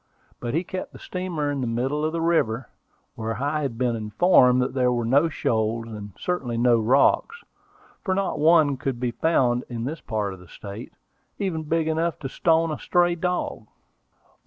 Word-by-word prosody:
But 120 +3 -3
he 165 - +1
kept 185 +1 -6
the - - -10
steamer 175 -6 -3
in 140 -2 -2
the 125 - -1
middle 130 +6 -1
of 155 - 0
the 165 0 -2
river, 135 -8 +1 0.4
where 115 -1 -4
I 145 +3 -1
had 135 -6 -3
been 125 -1 +1
informed 125 - +4
there 125 -2 +2
were 120 -1 -1
no 140 +7 +3
shoals; 115 -4 -1
and 105 -3 -8
certainly 135 -10 -2
no 120 -1 +4
rocks, 140 - +2 0.6
for 190 -2 0
not 195 -4 -1
one 155 -3 +4
could 130 -2 -3
be 125 -1 -1
found 125 -4 +1
in 115 -2 -4
this 150 +6 -4
part 105 -3 -2
of 95 - -11
the 90 - -15
state, 100 +7 -9 0.5
even 185 -6 -2
big 160 +1 0
enough 160 +1 0
to 135 - -4
stone 165 +2 +2
a 150 - -4
stray 175 0 +2
dog. 175 -10 -2
135 Hz, 180 wpm, -24 LUFS, 115-165 Hz, 0.6 s, informed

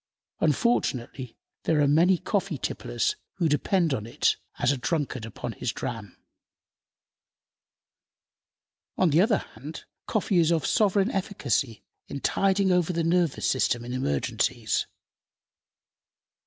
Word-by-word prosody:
Unfortunately, 135 - 0 0.3
there 160 -2 +2
are 145 - +4
many 170 +6 +4
coffee 195 -4 -1
tipplers - - -1 0.2
who 170 - 0
depend 165 +2 +1
upon 110 -4 -3
it 120 - +1 0.2
as - - +2
a 140 - -1
drunkard 130 -4 -2
upon 110 - -6
his - - -3
dram. 105 -5 -6 2.8
On 185 -4 +3
the 160 +4 +5
other 210 0 +3 0.2
hand, 150 +4 -9 0.2
coffee 200 -4 +1
is 165 0 +3
of 160 -4 +1
sovereign 205 +1 +2
efficacy 140 - -1 0.2
in 140 - -5
tiding 195 +4 +2
over 180 -1 +2
the 170 -1 -1
nervous 170 -3 +1
system 120 -2 +1
in 125 - -5
emergencies. 70 - -1
160 Hz, 120 wpm, -26 LUFS, 130-185 Hz, 2.8 s, the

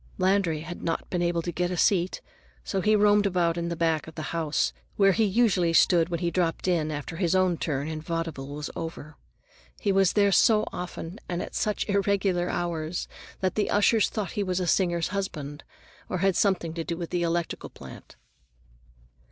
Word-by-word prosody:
Landry 185 -4 +2
had 170 +2 -7
not 165 - -2
been 180 - 0
able 170 -1 0
to 175 - -3
get 175 +1 -1
a 180 - -3
seat, 180 0 +2 0.4
so 195 - -2
he 215 +3 +3
roamed 205 0 +4
about 175 -3 +1
in 170 0 -2
the 170 - -2
back 160 -2 0
of 160 - -11
the 155 - -5
house, 160 -3 0 0.2
where 195 -1 +5
he 220 - +2
usually 190 -5 +2
stood 165 0 +4
when 170 -2 -3
he 170 -1 0
dropped 170 0 -1
in 165 -4 +1
after 150 +2 -5
his 180 -1 +1
own 185 -2 +3
turn 145 -3 -2
in 155 -1 -4
vaudeville 165 -4 -4
was 145 +1 -6
over. 160 -2 -6 0.6
He 205 - +1
was 195 -1 +3
there 200 -1 +4
so 215 +3 +4
often 180 +2 -6
and 175 -1 -2
at - - -9
such 210 -1 -1
irregular 195 -3 +1
hours 170 -1 -2 0.3
that 185 -1 +1
the 210 - 0
ushers 210 +1 +3
thought 205 -6 -3
he 205 - -2
was 185 -2 -1
a 180 - -1
singer's 175 -2 +1
husband, 155 -7 -4 0.5
or - - -1
had 195 0 +2
something 180 -5 +1
to 165 0 -3
do 170 0 -4
with 170 -1 -5
the 175 - 0
electrical 170 0 -2
plant. - - -12
175 Hz, 195 wpm, -27 LUFS, 165-195 Hz, 0.6 s, where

